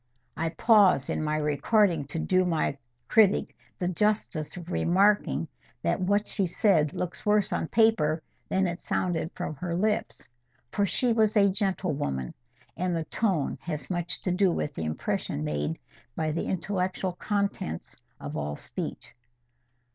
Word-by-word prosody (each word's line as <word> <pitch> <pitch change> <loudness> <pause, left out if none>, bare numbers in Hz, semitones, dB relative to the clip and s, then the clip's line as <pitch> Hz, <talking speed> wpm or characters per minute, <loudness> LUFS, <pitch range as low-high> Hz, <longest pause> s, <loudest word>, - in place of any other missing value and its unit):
I 165 +1 -1
pause 195 - +4
in - - -1
my 155 0 0
recording, 155 +3 +2
to 140 +4 -6
do 185 +3 +2
my 165 -5 0 0.3
critic 210 -3 +4 0.2
the 180 - -1
justice 185 -5 -1
of 175 0 -8
remarking 180 - +2 0.4
that 85 - +1
what 200 +3 +2
she 195 -3 -1
said 165 -5 +2
looks 180 -1 -4
worse 210 -1 +2
on - - -1
paper 165 -9 +3 0.3
than 190 0 +2
it 175 0 -3
sounded 170 -3 -1
from 180 -3 -3
her 170 +2 -3
lips; 210 +3 -1 0.4
for 205 -1 +1
she 245 +4 +1
was 220 -1 +3
a 200 -1 +5
gentlewoman, 160 - -1 0.4
and 180 -1 -1
the 165 - -1
tone 190 -9 0
has 155 -1 -5
much 175 0 -2
to 185 - 0
do 185 +1 +3
with 150 -3 -2
the 80 - -4
impression 75 -1 -2
made 75 +1 -2 0.4
by 155 -1 -1
the 160 - -2
intellectual 185 0 -1
contents 200 - -3 0.2
of - - -6
all 75 0 -2
speech. - - -6
180 Hz, 150 wpm, -28 LUFS, 155-200 Hz, 0.4 s, a